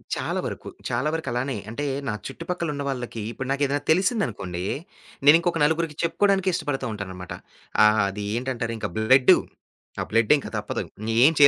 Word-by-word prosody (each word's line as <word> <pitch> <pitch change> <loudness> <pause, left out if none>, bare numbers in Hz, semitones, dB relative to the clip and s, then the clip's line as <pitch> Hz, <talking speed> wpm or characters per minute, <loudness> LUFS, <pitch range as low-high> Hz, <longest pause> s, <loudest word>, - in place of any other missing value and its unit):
చాలా - - -2
వరకు. - - -5 0.2
చాలా 125 +5 0
వరకు 165 0 -3
అలానే. 125 0 -1
అంటే 125 +6 -3 0.2
నా 105 - 0
చుట్టుపక్కల 170 +4 -4
ఉన్న 140 0 -3
వాళ్ళకి 120 -4 -4
ఇప్పుడు 130 +2 -5
నాకు 140 +1 +1
ఏదైనా 145 +1 -1
తెలిసిందనుకోండి, 130 - 0 0.6
నేను 145 +2 +9
ఇంకొక 170 -1 0
నలుగురికి 160 -1 0
చెప్పుకోవడానికి 190 +2 +2
ఇష్టపడుతా 145 -4 -2
ఉంటాననమాట. 95 -3 -6 0.5
ఆ! - - +9 0.2
అది 100 +1 -5
ఏంటంటారు, 120 -2 -2
ఇంకా 110 -1 -3
బ్లడ్డు. 125 +4 +6 0.6
ఆ - - 0
బ్లడ్ 115 +3 +5
ఇంకా - - -7
తప్పదు. - - -3 0.4
ఏం 160 - +6
135 Hz, 155 wpm, -25 LUFS, 115-165 Hz, 0.6 s, నేను